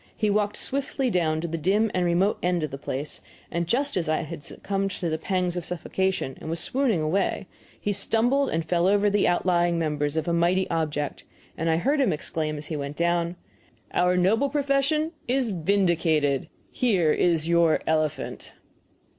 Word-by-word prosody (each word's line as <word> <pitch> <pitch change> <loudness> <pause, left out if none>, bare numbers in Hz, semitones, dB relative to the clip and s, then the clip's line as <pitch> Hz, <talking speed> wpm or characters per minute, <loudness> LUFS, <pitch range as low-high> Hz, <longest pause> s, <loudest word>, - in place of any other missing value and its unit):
He 210 -1 +1
walked 210 0 +1
swiftly 270 -1 -1
down 160 -4 +1
to 170 - -3
the 165 0 -3
dim 205 +6 +2
remote 180 +3 +1
end 175 -2 0
of 155 - -3
the 135 - -6
place, 140 +1 -4 0.3
and 170 0 -1
just 275 +8 +1
as 170 -4 -1
I 155 0 0 0.2
succumbed 195 +5 -3
to 175 - -3
the 160 - -1
pangs 180 -2 -1
of 175 - -3
suffocation 180 -3 -2
and 160 - -6
was 165 +1 -1
swooning 250 - +1
away 185 +6 0 0.3
he 205 - -1
stumbled 240 +7 +1
and 165 0 -1
fell 175 +2 +2
over 205 +1 +3
the 205 0 +2
outlying 175 -1 +2
members 150 -2 -1
of 160 - -1
a 170 - +1
mighty 175 +3 +2
object, 150 -3 -2 0.3
and 165 +1 -1
I 160 - +3
heard 280 - +1
him 245 -8 +3
exclaim 155 0 -3
as 150 - -7
he 155 - -4
went 140 0 -5
down: 170 0 +1 0.6
"Our 180 0 +2
noble 220 +10 +3
profession 285 +2 +1 0.2
is 250 -2 +1
vindicated. 165 -6 +1 0.2
Here 190 -11 +2
is 165 -2 +2
your 170 -1 +3
elephant!" 155 -2 -2
175 Hz, 175 wpm, -25 LUFS, 160-205 Hz, 0.6 s, over